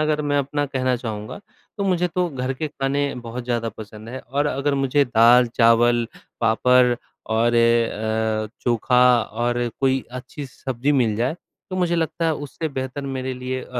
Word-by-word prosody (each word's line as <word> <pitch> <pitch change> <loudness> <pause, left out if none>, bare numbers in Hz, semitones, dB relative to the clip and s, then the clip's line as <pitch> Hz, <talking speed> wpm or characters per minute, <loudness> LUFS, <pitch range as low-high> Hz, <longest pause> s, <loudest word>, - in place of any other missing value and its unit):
अगर 155 0 +1
मैं 145 0 +1
अपना 145 +1 -1
कहना 130 -2 0
चाहूँगा, 110 -3 -6 0.4
तो 200 - 0
मुझे 180 -2 +1
तो 180 +1 -1
घर 130 -2 -3
के 155 +4 -3
खाने 140 0 -1
बहुत 120 +1 -7
ज़्यादा 120 -2 -1
पसंद 110 +1 -10
है 130 - -6
और 140 +4 -1
अगर 140 +1 0
मुझे 135 +1 +2
दाल-चावल, 120 0 +4 0.3
पापड़, 125 +2 +4 0.3
और 115 +2 +1
अ, 110 -2 +1 0.2
चोखा 125 +1 +3 0.2
और 120 +2 -1
कोई 135 -1 +1
अच्छी 130 +3 -7
स 130 - -22
सब्ज़ी 130 +2 0
मिल 120 -6 +2
जाए 125 +9 -1 0.3
तो 185 - -3
मुझे 175 -2 +1
लगता 165 +1 -1
है 160 - +2
उससे 145 +3 -5
बेहतर 135 0 -5
मेरे 130 -1 -3
लिए 130 +1 -4
अ, - - -11
125 Hz, 170 wpm, -22 LUFS, 115-140 Hz, 0.4 s, दाल-चावल